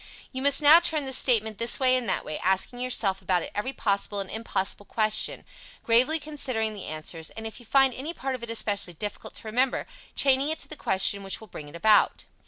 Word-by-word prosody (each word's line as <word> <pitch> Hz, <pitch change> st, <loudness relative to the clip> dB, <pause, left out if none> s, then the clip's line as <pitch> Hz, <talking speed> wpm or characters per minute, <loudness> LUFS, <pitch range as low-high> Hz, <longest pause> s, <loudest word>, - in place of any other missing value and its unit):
You 260 Hz, -, -4 dB
must 280 Hz, +2 st, +3 dB
now 305 Hz, +3 st, +9 dB
turn 320 Hz, -4 st, +1 dB
this 265 Hz, -1 st, +1 dB
statement 220 Hz, -4 st, +1 dB
this 230 Hz, +1 st, +1 dB
way 255 Hz, -1 st, +4 dB
and 245 Hz, -5 st, -1 dB
that -, -, -1 dB
way; 155 Hz, -, -5 dB
asking 190 Hz, +6 st, 0 dB
yourself 210 Hz, -6 st, 0 dB
about 180 Hz, -2 st, 0 dB
it -, -, -8 dB
every 210 Hz, +6 st, -2 dB
possible 200 Hz, -4 st, -1 dB
and 195 Hz, -1 st, -5 dB
impossible 205 Hz, -2 st, -3 dB
question, 215 Hz, -1 st, 0 dB, 0.4 s
gravely 250 Hz, +7 st, +4 dB
considering 255 Hz, -8 st, -2 dB
the 205 Hz, -, -8 dB
answers, 155 Hz, +1 st, -4 dB
and, 225 Hz, -, -9 dB
if 220 Hz, -, -7 dB
you 240 Hz, -, -14 dB
find 270 Hz, 0 st, +4 dB
any 275 Hz, +7 st, -5 dB
part 270 Hz, -5 st, -4 dB
of 255 Hz, -, -6 dB
it 235 Hz, -, -7 dB
especially 205 Hz, -5 st, -1 dB
difficult 205 Hz, +5 st, -6 dB
to -, -, -3 dB
remember, 250 Hz, +4 st, 0 dB, 0.3 s
chaining 275 Hz, +1 st, +3 dB
it 315 Hz, -, -2 dB
to -, -, -6 dB
the 310 Hz, -, -8 dB
question 200 Hz, -5 st, +1 dB
which 195 Hz, -1 st, -4 dB
will 220 Hz, -, -12 dB
bring 150 Hz, -3 st, -9 dB
it 170 Hz, +7 st, -10 dB
out. 215 Hz, -1 st, +4 dB
225 Hz, 220 wpm, -26 LUFS, 200-265 Hz, 0.4 s, now